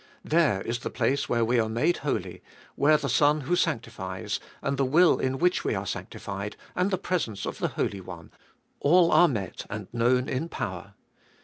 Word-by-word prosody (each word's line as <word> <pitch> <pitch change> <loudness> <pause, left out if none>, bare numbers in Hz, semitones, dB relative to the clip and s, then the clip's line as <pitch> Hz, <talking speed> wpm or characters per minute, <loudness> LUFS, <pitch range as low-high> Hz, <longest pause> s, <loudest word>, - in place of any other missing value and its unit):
There 150 - +2
is 120 +1 -2
the - - -4
place 140 +1 0
where 115 -1 +2
we 120 +1 +2
are 110 -1 +1
made 120 +10 +1
holy, - - -3 0.3
where 150 +2 +4
the 140 - -3
Son 145 +4 +3
who 150 +6 0
sanctifies, - - -2 0.2
and 140 - 0
the 135 - +2
will 160 +7 +4
in 130 0 -1
which 180 +5 +2
we - - 0
are - - -3
sanctified, 100 +1 -5 0.2
and 180 +2 +1
the 190 - 0
presence 160 - -2
of - - -5
the - - +1
Holy 100 -1 -1
One, 85 -3 -10 0.5
all 170 +3 +5
are 175 - +7
met 105 - -4
and 105 -2 -5
known 125 +2 +2
in 145 +6 -2
power. 100 - -5
130 Hz, 190 wpm, -27 LUFS, 105-155 Hz, 0.5 s, are